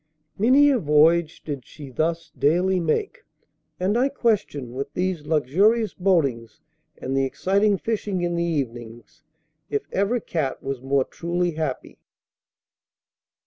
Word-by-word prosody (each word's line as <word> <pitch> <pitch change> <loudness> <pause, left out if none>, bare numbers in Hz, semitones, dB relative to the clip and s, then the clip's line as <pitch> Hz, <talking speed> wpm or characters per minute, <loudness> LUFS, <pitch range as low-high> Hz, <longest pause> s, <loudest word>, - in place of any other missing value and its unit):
Many 270 +7 +5
a 260 - +2
voyage 155 0 +3
did 140 -4 -5
she 140 0 -11
thus 165 +5 -2
daily 180 +5 +2
make, 405 - -1 0.6
and 190 +4 +1
I 255 +3 +2
question, 200 - -1
with 140 +2 -4
these 180 -5 -2
luxurious 190 - +2
boatings 140 - 0 0.4
and 130 +1 -4
the 135 - +2
exciting 200 +8 +1
fishing 205 -4 -2
in 175 0 -1
the 170 - 0
evenings, 125 -2 -5 0.5
if 140 - -1
ever 205 +5 +1
cat 155 -10 -3
was 135 -2 -4
more 135 0 +1
truly 175 +1 -2
happy. 155 -5 -4
165 Hz, 130 wpm, -23 LUFS, 140-195 Hz, 0.6 s, Many